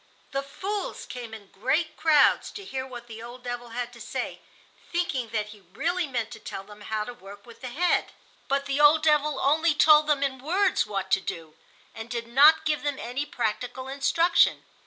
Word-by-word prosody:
The 275 - -1
fools 385 +9 -5
came 245 -3 -8
in 210 -3 -11
great 300 - 0
crowds 310 -3 +4
to 400 - -8
hear 265 -5 -4
what 240 -2 -9
the 225 -1 -10
old 240 +2 -10
devil 245 -1 -5
had 245 +1 -4
to 235 - -13
say, - - -4 0.5
thinking 310 -9 -1
that 215 -2 -2
he 210 -1 -13
really 355 - -1
meant 235 -4 -3
to - - -9
tell 195 - -7
them 210 +1 -14
how 215 0 -2
to 245 - -7
work 200 -3 -13
with 235 -1 -15
the 255 - -5
head. 345 +8 +1 0.4
But 275 +1 0
the 280 +1 -1
old 300 +1 +6
devil 300 -2 +3
only 310 +3 +3
told 300 0 +6
them 290 -2 +2
in 265 -2 -1
words 360 - +1
what 195 -2 -4
to - - +4
do, 160 -4 -6 0.4
and 225 +1 -8
did 235 -1 -3
not 285 +7 +6
give 300 -1 0
them 290 -2 -2
any 260 +5 -4
practical 245 +3 -3
instruction. 285 +6 +2
260 Hz, 200 wpm, -26 LUFS, 230-300 Hz, 0.5 s, old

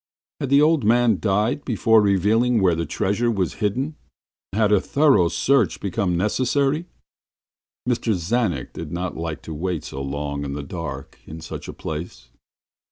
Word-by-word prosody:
Had 140 - -3
the 140 +2 +5
old 155 -3 +3
man 115 -1 +3
died 105 +7 0
before 115 -2 +3
revealing 110 +5 +3
where 90 -4 +3
his 85 0 -3
treasure 105 +5 0
was 100 -3 -1
hidden, 130 +9 -1 0.5
and 105 - -2
had 105 -2 +3
a 105 -3 +4
thorough 140 - +3
search 135 +4 +2
become 100 -3 -1
necessary? 135 - +1 1.0
Mr. 115 -3 +1
Czanek 90 - -1
did 80 -2 -7
not 90 +1 -3
like 80 -1 -5
to 80 - -7
wait 85 +1 -3
so 70 - -6
long 70 +1 -3
in 70 -1 -4
the 70 0 -5
dark 70 -3 -7
in 80 - -8
such 80 - -8
a - - -6
place. 75 -6 -7
100 Hz, 165 wpm, -22 LUFS, 85-120 Hz, 1.0 s, the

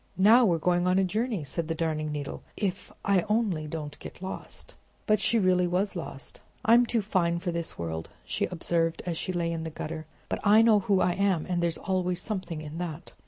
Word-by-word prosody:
"Now 225 +6 +7
we're 175 -5 +3
going 175 +2 +1
on 180 +1 +3
a 195 - +4
journey," 215 0 -1
said 155 +4 -3
the 165 - -2
Darning 155 -2 -1
Needle. 145 -2 -5 0.2
"If 195 -3 -3
I 200 -2 +4
only 205 -8 +1
don't 150 -2 -6
get - - -10
lost!" 190 +1 -7 0.3
But 215 -2 +3
she 235 - +2
really 185 -3 +3
was 185 +3 0
lost. 160 -5 -7 0.3
"I'm 235 +2 +6
too 230 -3 +1
fine 175 -4 +1
for 175 +1 -2
this 170 -1 -4
world," 80 -1 -4 0.2
she - - -1
observed, 165 -1 -1
as 175 -2 -2
she 185 - -2
lay 170 -2 -1
in 165 -1 -3
the 160 - -4
gutter. 155 0 -6 0.2
"But - - -2
I 215 +2 +6
know 220 -2 +6
who 195 -1 +2
I 180 - +3
am, 190 -4 +1
and 175 -1 -1
there's 170 -1 0
always 180 -1 -1
something 185 -6 -4
in 155 +2 -7
that!" 170 -1 -5
180 Hz, 210 wpm, -28 LUFS, 165-195 Hz, 0.3 s, Now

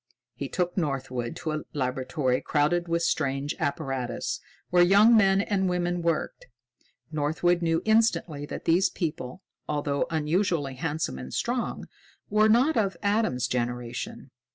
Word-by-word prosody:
He - - -5
took 180 -1 -1
Northwood 135 -7 -2
to 155 - -4
a 155 0 -2
laboratory 130 0 -1
crowded 170 +4 +1
with 170 0 0
strange 140 -2 0
apparatus, 135 -5 -2 0.3
where 180 0 +5
young 200 +6 +6
men 195 -2 +5
and 195 -2 0
women 175 0 -1
worked. 165 -2 -2 0.6
Northwood 160 +4 +1
knew 165 -1 +1
instantly 220 -10 +2
that - - -7
these 175 +3 +4
people, 160 -1 -4 0.3
although 145 +1 0
unusually 160 -2 0
handsome 150 - -3
and 65 0 -8
strong, 245 0 -2 0.4
were 215 +1 +4
not 255 +8 +4
of 200 -3 +1
Adam's 200 - +1
generation. 120 -1 -4
160 Hz, 130 wpm, -27 LUFS, 135-185 Hz, 0.6 s, young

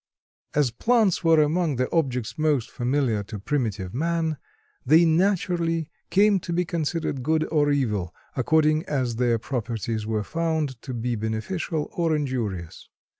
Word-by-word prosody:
As 145 -4 +3
plants 215 - +2
were 165 -1 +5
among 155 0 +2
the 130 +1 0
objects 125 -8 0
most 150 -6 0
familiar 125 -3 0
to 105 - -7
primitive 105 -5 -2
man, 160 +2 0 0.5
they 155 +6 +6
naturally 170 -2 +1 0.2
came 200 0 +4
to 175 - -6
be 175 +1 +1
considered 160 -4 -2
good 155 +4 +1
or 150 -2 +3
evil, 105 - 0 0.2
according 155 +4 +3
as 125 -5 -1
their 120 -1 +2
properties 115 -2 -3
were 110 -1 -1
found 160 -3 -2
to 130 -3 -6
be 120 +1 -1
beneficial 130 - -2
or 165 -2 +1
injurious. 115 - -3
145 Hz, 140 wpm, -25 LUFS, 120-165 Hz, 0.5 s, they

